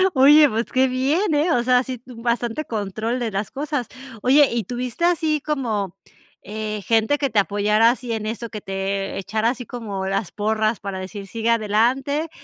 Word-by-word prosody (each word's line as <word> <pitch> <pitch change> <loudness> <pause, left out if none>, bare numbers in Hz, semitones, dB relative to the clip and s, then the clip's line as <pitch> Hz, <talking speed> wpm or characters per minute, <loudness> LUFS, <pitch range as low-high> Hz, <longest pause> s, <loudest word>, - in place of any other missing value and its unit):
Oye, 290 +2 +7
pues 225 +1 -1
qué 260 +1 +3
bien, 290 +9 +1
eh, 310 +4 +2
o 245 -6 +2
sea, 250 +1 +3
sí, 255 -1 -5
tú 240 -2 -12
bastante 240 +4 -1
control 220 +3 -3
de 230 -3 -2
las 195 +1 -3
cosas. 280 -3 -3 0.3
Oye, 275 +3 +5
¿y 235 -1 -1
tuviste 245 - -3
así 320 -4 +1
como, 220 - -2 0.5
eh, 215 0 -5
gente 225 +5 +2
que 280 -2 0
te 215 - +2
apoyara 210 +3 +3
así 245 -1 -4
en 220 -1 -3
eso, 230 +1 -4
que 215 -2 -7
te, 195 0 -3
eh, - - -4
echara 215 +4 0
así 245 0 -4
como 205 -5 -5
las 195 0 -2
porras 215 +1 0
para 195 -2 -5
decir 195 +1 -7
sigue 225 +3 -2
adelante? 245 +8 +1
230 Hz, 190 wpm, -22 LUFS, 210-260 Hz, 0.5 s, Oye